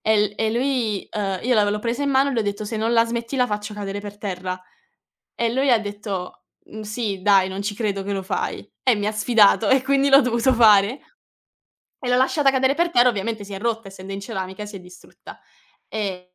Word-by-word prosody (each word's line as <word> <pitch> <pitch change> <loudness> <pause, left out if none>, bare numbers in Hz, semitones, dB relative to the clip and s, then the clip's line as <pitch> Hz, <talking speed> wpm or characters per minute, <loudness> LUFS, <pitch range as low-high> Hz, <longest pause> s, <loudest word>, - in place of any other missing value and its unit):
E 220 0 +2
l 205 - -11
e 220 -1 0
lui 240 -5 -1
ehm, 195 -3 -3
io 250 +1 +1
la 210 - +5
v - - -1
io 205 - +1
l'ho 210 - -2
presa 235 +5 -2
in 280 - 0
mano 270 +1 +3
e 265 - -3
l'ho 225 - +1
detto: 205 +1 -3
"Se 220 +1 -4
non 225 +2 0
la 230 -1 +5
smetti 235 +2 -4
la 250 -1 +3
faccio 210 0 -4
cadere 200 -1 -5
per 205 0 -9
terra". 185 -2 -5 0.8
E 230 -1 0
lui 265 +3 +1
ha 235 - +5
detto: 205 -3 -6 0.2
"Mh 215 - -10
sì, 210 -3 -4
dai, 195 -2 +4
non 190 +1 -5
ci 205 0 -3
credo 200 -3 -2
che 200 - -3
lo 195 -1 -3
fai". 185 - -3 0.2
E 255 -3 +4
mi 205 0 -3
ha 215 - 0
sfidato 215 -1 +3
e 265 -1 +4
quindi 275 +1 +2
l'ho 275 +1 +7
dovuto 250 +1 +1
fare. 220 +2 +5 1.1
E 245 - -2
l'ho 250 - +3
lasciata 270 +2 +3
cadere 265 +1 +2
per 340 +2 +1
terra, 245 -4 +5
ovviamente 215 0 -4
si 200 - -10
è 195 - -6
rotta, 225 -1 -2
essendo 195 0 -9
in 195 - -4
ceramica 190 +1 -6
si 205 - -11
è 190 - -7
distrutta. 180 0 -14 0.5
E 195 -4 -4
215 Hz, 235 wpm, -22 LUFS, 200-245 Hz, 1.1 s, l'ho